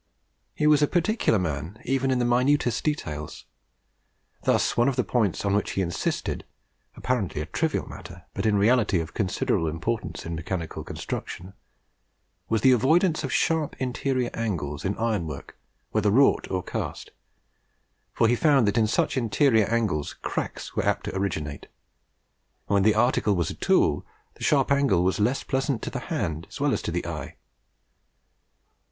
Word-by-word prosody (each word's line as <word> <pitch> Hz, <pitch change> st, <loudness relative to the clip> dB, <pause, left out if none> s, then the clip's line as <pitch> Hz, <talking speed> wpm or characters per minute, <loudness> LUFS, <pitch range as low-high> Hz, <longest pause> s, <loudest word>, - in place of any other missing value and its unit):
He 150 Hz, -, 0 dB
was 150 Hz, -1 st, +5 dB
particular 95 Hz, -, 0 dB
even 135 Hz, 0 st, 0 dB
in 130 Hz, -, +2 dB
the 120 Hz, -, +1 dB
minutest 120 Hz, 0 st, +2 dB
details. 75 Hz, -, -3 dB, 1.0 s
Thus -, -, +2 dB
one 120 Hz, +3 st, +4 dB
of 135 Hz, -, -2 dB
the 125 Hz, -, +1 dB
points 105 Hz, -6 st, 0 dB
on 100 Hz, -, +1 dB
which 105 Hz, -, 0 dB
he 95 Hz, -, 0 dB
insisted 85 Hz, -1 st, -2 dB, 0.5 s
apparently 115 Hz, -11 st, -1 dB
a 75 Hz, -, -2 dB
trivial 160 Hz, -, -1 dB
matter, 90 Hz, -2 st, -10 dB
but -, -, -1 dB
in 105 Hz, -, +3 dB
reality 105 Hz, -3 st, +3 dB
of 80 Hz, 0 st, -5 dB
considerable 90 Hz, -4 st, 0 dB
importance 95 Hz, +8 st, -3 dB
in 85 Hz, -, -4 dB
mechanical 85 Hz, 0 st, -4 dB
construction 90 Hz, +2 st, -6 dB, 1.0 s
was 110 Hz, -1 st, +1 dB
the 130 Hz, -, +6 dB
avoidance 160 Hz, -, +3 dB
of 135 Hz, -, -3 dB
sharp 160 Hz, 0 st, +1 dB
interior 130 Hz, 0 st, -1 dB
angles 80 Hz, -11 st, -3 dB
in 100 Hz, +1 st, -1 dB
ironwork, 95 Hz, -11 st, -3 dB, 0.4 s
whether 105 Hz, -1 st, +2 dB
wrought 135 Hz, +7 st, +4 dB
or 90 Hz, -1 st, -2 dB
cast; -, -, -5 dB, 1.0 s
for 115 Hz, -, +2 dB
he 120 Hz, -, +3 dB
found 135 Hz, -4 st, +4 dB
that 100 Hz, +3 st, +2 dB
in 110 Hz, -, +3 dB
such 110 Hz, -, +1 dB
interior 115 Hz, -1 st, +3 dB
angles 105 Hz, -10 st, -1 dB
cracks -, -, -4 dB
were -, -, +1 dB
apt -, -, 0 dB
to -, -, -5 dB
originate; 80 Hz, -7 st, -3 dB, 1.0 s
and -, -, -1 dB
when 100 Hz, -, +4 dB
the 105 Hz, +2 st, +4 dB
article 110 Hz, -3 st, +2 dB
was 85 Hz, -2 st, 0 dB
a -, -, -5 dB
tool, -, -, +2 dB, 0.3 s
the -, -, -11 dB
sharp 140 Hz, -2 st, +2 dB
angle 140 Hz, -11 st, +3 dB
was 95 Hz, +3 st, +1 dB
less 120 Hz, +6 st, +1 dB
pleasant 135 Hz, -2 st, -1 dB
to -, -, -4 dB
the -, -, -3 dB
hand 80 Hz, 0 st, -2 dB
as -, -, -9 dB
well -, -, +2 dB
as -, -, -1 dB
to -, -, -4 dB
the -, -, -2 dB
eye. -, -, -6 dB
110 Hz, 160 wpm, -26 LUFS, 90-130 Hz, 1.0 s, the